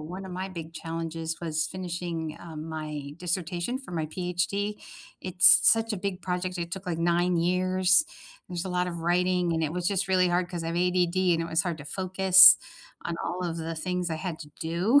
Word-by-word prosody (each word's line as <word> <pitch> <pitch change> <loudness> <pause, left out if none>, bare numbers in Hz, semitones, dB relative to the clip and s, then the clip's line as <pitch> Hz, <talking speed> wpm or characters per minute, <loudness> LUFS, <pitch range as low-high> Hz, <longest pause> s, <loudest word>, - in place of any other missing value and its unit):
one 180 +5 -7
of 185 - -8
my 185 +1 -4
big 165 -3 -8
challenges 165 0 -4
was 160 -2 -1
finishing, 175 -3 -5
uh, 165 -2 -9
my 155 -2 -6
dissertation 175 +5 -2
for 265 -8 -11
my 160 -2 -2
PhD. 180 +5 -2 0.5
It's 185 0 +6
such 225 0 +4
a - - -2
big 190 -1 -4
project, 180 0 -3
it 170 0 -4
took, 190 0 -6
like, 170 -2 -2
9 175 +1 +2
years. 185 - +3 0.4
There's 175 -1 -4
a - - -4
lot 180 0 0
of 170 -1 -5
writing, 180 +1 +1
and 165 0 0
it 155 -1 -1
was 180 0 -2
just 195 0 0
really 185 -1 +3
hard 175 0 0
'cause 175 -2 -5
I - - -3
have 165 - -3
ADD, 180 0 +2
and 165 - -1
it - - -4
was 160 +2 +1
hard 175 -4 -3
to 145 - -9
focus 190 +3 +7 0.5
on 170 - -3
all 180 +1 -3
of 170 -2 -3
the 165 0 -4
things 180 +1 -2
I 160 - -2
had 165 -1 -5
to 150 -2 -10
do, 180 +11 +3
175 Hz, 210 wpm, -27 LUFS, 165-185 Hz, 0.5 s, focus